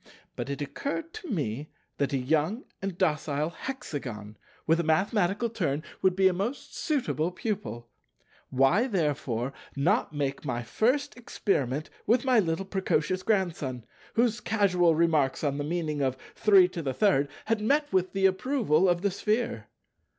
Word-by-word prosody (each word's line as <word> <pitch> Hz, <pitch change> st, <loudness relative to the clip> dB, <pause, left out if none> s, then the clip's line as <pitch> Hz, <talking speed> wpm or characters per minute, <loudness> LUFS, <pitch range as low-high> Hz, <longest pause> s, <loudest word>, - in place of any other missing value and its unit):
But -, -, -4 dB
it 140 Hz, +1 st, -3 dB
occurred 290 Hz, -, -4 dB
to 425 Hz, -6 st, -8 dB
me 145 Hz, -, -2 dB, 0.3 s
that 140 Hz, -, 0 dB
a 140 Hz, -, +1 dB
young 155 Hz, -, 0 dB, 0.2 s
and 195 Hz, -2 st, -4 dB
docile 155 Hz, -3 st, 0 dB
Hexagon, 130 Hz, -, -6 dB, 0.3 s
with 165 Hz, +1 st, +3 dB
a -, -, +1 dB
mathematical 190 Hz, +6 st, +1 dB
turn, 165 Hz, -10 st, -2 dB, 0.2 s
would 185 Hz, -1 st, +3 dB
be 190 Hz, 0 st, +5 dB
a 190 Hz, -, +3 dB
most 210 Hz, +10 st, -4 dB
suitable 255 Hz, -, 0 dB
pupil. 185 Hz, -, -4 dB, 0.6 s
Why 135 Hz, -, +3 dB
therefore 140 Hz, -, -1 dB, 0.2 s
not 175 Hz, -, +2 dB
make 145 Hz, -2 st, -2 dB
my 120 Hz, -4 st, -2 dB
first 260 Hz, -, 0 dB
experiment 155 Hz, -, -1 dB, 0.2 s
with 245 Hz, +4 st, +3 dB
my 255 Hz, -3 st, +5 dB
little 175 Hz, 0 st, 0 dB
precocious 185 Hz, -2 st, 0 dB
Grandson, 165 Hz, -, -1 dB, 0.3 s
whose 235 Hz, 0 st, +2 dB
casual 180 Hz, -6 st, +3 dB
remarks 155 Hz, -5 st, +2 dB
on 140 Hz, -1 st, 0 dB
the -, -, -1 dB
meaning 155 Hz, -2 st, -2 dB
of 130 Hz, -1 st, 0 dB, 0.2 s
33 180 Hz, -5 st, +3 dB, 0.2 s
had 225 Hz, -1 st, 0 dB
met 290 Hz, +7 st, +1 dB
with 185 Hz, -1 st, +1 dB
the 195 Hz, -1 st, +2 dB
approval 190 Hz, -, +2 dB
of 175 Hz, +1 st, +1 dB
the 200 Hz, -, +2 dB
Sphere? 210 Hz, -, -1 dB
175 Hz, 145 wpm, -28 LUFS, 145-215 Hz, 0.6 s, be